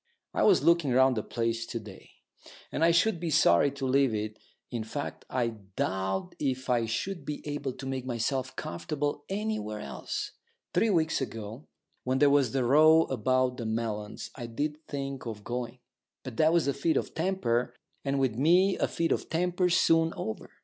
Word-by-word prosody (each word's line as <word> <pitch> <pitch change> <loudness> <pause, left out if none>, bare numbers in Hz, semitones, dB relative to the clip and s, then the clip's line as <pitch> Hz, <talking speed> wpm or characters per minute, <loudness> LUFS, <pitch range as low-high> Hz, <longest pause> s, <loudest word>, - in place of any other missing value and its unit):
I - - 0
was 405 - +5
looking 170 -5 +4
round 130 +1 +5
the 110 - 0
place 115 +1 -2
to 115 - -4
day, 105 -3 -12 0.6
and 160 - -1
I 165 - +6
should 175 +3 +3
be 170 -1 -2
sorry 85 - +5
to 140 -1 -4
leave 130 -3 +3
it 105 0 -4 0.3
in 120 -3 -2
fact, 140 +6 -5
I 125 -2 0 0.3
doubt 95 - -1
if 130 -2 -1
I 115 -2 +2
should 180 - -3
be 150 0 -6
able 145 -2 -3
to 135 - -9
make 135 -1 -3
myself 130 +1 -2
comfortable 145 - -3
anywhere 195 - -2
else. 70 - -5 0.4
Three 225 - +3
weeks 160 -6 +2
ago, 115 +1 -6 0.4
when 130 +1 0
there 145 +1 +5
was 140 -5 +3
that 135 -1 0
row 155 +5 +6
about 130 +1 +1
the 120 - -4
melons, 110 -2 -3
I 120 -3 -6
did 150 +6 -3
think 135 -3 -4
of 105 -2 -6
going. 120 +1 -4 0.5
But 130 -4 -8
that 155 0 +5
was 170 -3 +2
a 140 - +2
fit 160 +4 +1
of - - -2
temper, 160 -9 0 0.3
and 140 0 0
with 130 -4 +2
me 180 - +4
a - - +2
fit 165 -1 -1
of - - -1
temper's 180 +1 +1
soon 165 0 +3
over. 110 0 -5
135 Hz, 185 wpm, -29 LUFS, 115-160 Hz, 0.6 s, I